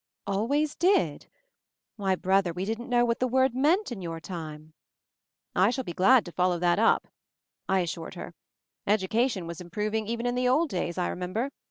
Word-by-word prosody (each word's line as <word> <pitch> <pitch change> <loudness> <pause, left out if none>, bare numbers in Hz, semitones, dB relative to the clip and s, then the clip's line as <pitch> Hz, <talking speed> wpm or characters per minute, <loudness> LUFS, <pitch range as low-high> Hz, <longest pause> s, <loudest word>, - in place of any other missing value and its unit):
"Always 275 +10 0
did? 380 +3 +1 0.7
Why 195 -4 0
brother, 190 -1 +1
we 180 +3 -3
didn't 225 +4 -4
know 240 -1 +3
what 235 0 0
the 255 - +1
word 260 0 +2
meant 310 - +2
in 215 -5 -5
your 165 -2 -5
time." 155 -3 -8 0.8
"I 190 +3 +4
shall 260 +2 -2
be 175 - -6
glad 230 +8 +5
to 175 - -8
follow 180 0 +1
that 175 +2 +2
up," 225 - +3 0.6
I 190 -1 +3
as 170 -3 -2
sured 165 +2 -8
her. 175 - -8 0.5
"Education 210 0 +1
was 170 +1 -7
improving 210 +4 -2
even 235 +1 -3
in 245 - +1
the 250 0 +1
old 295 +6 +3
days, 175 -4 -3
I 180 - 0
remember. 195 +9 -3
205 Hz, 185 wpm, -27 LUFS, 180-250 Hz, 0.8 s, glad